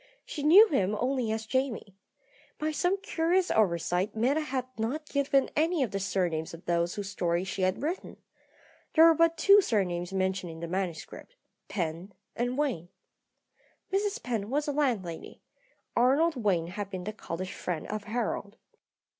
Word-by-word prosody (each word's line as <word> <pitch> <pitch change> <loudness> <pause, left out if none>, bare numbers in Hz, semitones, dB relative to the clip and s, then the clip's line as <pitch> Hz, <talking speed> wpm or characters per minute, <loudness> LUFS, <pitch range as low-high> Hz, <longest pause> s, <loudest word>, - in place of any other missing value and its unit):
She 295 - -6
knew 360 +10 +8
him 205 -8 +1
only 250 -3 0
as 220 0 -3
Jamie. 245 -5 -2 0.6
By 310 +1 -1
some 355 +6 0
curious 345 +3 +1
oversight 180 0 +1
Meta 255 +7 +2
had 265 -4 -2
not 250 +8 -3
given 280 -2 +1
any 320 0 +2
of 230 - -3
the 195 - -2
surnames 175 -5 -1
of 165 - -15
those 170 +1 0
whose 200 -2 -5
story 175 -2 0
she 190 0 -4
had 185 +6 0
written. 335 +5 -4 0.8
There 320 0 +8
were 330 - +8
but 330 +1 +3
two 400 +4 +7
surnames 180 - -1
mentioned 190 -2 -1
in 160 - -10
the 170 - -5
manuscript, 185 - -5 0.3
Penn 175 +1 -4 0.2
and 245 +2 -1
Wayne. 220 - -1 1.0
Mrs. 400 +1 0
Penn 225 -4 -2
was 290 +3 0
a - - +1
landlady; 230 - -2 0.5
Arnold 280 +7 +3
Wayne 200 -9 +1
had 200 +1 -5
been 185 -2 -5
the 215 +3 -4
college 185 -3 -6
friend 170 -4 -4
of 210 -1 -5
Harold. 220 -1 -3
220 Hz, 160 wpm, -29 LUFS, 185-290 Hz, 1.0 s, knew